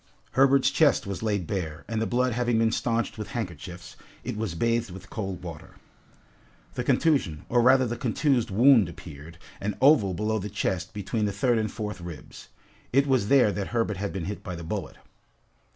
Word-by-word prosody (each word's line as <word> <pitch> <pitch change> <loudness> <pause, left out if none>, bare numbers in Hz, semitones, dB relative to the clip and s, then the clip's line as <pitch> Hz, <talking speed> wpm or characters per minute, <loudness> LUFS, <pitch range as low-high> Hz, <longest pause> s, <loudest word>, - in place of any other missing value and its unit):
Herbert's 135 0 +4
chest 145 -2 +3
was 100 -2 -5
laid 105 -5 -1
bare, 80 -4 -4
and 110 0 -2
the 110 - 0
blood 125 0 +1
having 120 0 +1
been 115 0 +3
stanched 115 -1 -1
with 105 - -4
handkerchiefs, 90 - -6 0.3
it 125 -1 -4
was 105 -6 -3
bathed 115 +4 0
with 95 +1 -11
cold 95 -5 -4
water. 90 +2 -9 1.0
The - - -3
contusion, 135 - +1
or 120 0 +3
rather 130 +2 +5
the 120 0 -2
contused 125 0 +1
wound 115 -1 +5
appeared, 80 -1 -11 0.2
an 105 0 -3
oval 125 - +5
below 110 +3 -1
the 105 +1 -5
chest 95 +3 -2
between 105 +2 -2
the 100 - 0
third 115 +4 +1
and 110 -1 -2
fourth 105 -4 -5
ribs. 85 -3 -10 0.4
It 140 +2 +4
was 130 -7 +2
there 125 -4 +5
that 100 -1 -3
Herbert 115 -4 -1
had 100 +1 -3
been 95 -4 -4
hit 105 +1 -5
by 90 - -5
the 85 - -7
bullet. 80 - -4
110 Hz, 185 wpm, -26 LUFS, 95-120 Hz, 1.0 s, rather